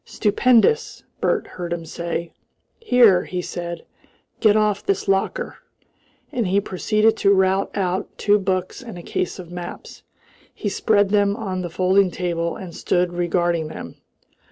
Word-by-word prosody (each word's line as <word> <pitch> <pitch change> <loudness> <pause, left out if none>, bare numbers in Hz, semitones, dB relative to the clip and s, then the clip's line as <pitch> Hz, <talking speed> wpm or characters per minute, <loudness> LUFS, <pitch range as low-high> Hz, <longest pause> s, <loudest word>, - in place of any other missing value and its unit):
"Stupendous!" 250 - +2 0.2
Bert - - +1
heard 175 -1 -7
him 170 -1 -3
say. 170 +1 -4 0.5
"Here!" 240 - +5
he 180 - -4
said, 175 -1 -5 0.5
"get 215 -2 +4
off 210 -2 +1
this 195 -1 -1
locker." 195 - 0 0.7
And 235 -5 -1
he 195 +2 +3
proceeded 215 +3 +1
to 200 - +3
rout 190 0 +2
out 185 -2 -1
two 205 0 +3
books 185 +1 -2
and 230 -7 -9
a 175 - -9
case 180 - -3
of 175 -2 -10
maps. 175 -1 -8 0.5
He 205 - -2
spread 205 0 +2
them 200 -1 +2
on 190 -5 -3
the 175 - -4
folding 185 +2 +3
table, 170 -2 -2
and 180 -3 -8
stood 180 -1 0
regarding 175 -2 0
them. - - -9
190 Hz, 150 wpm, -22 LUFS, 175-210 Hz, 0.7 s, Here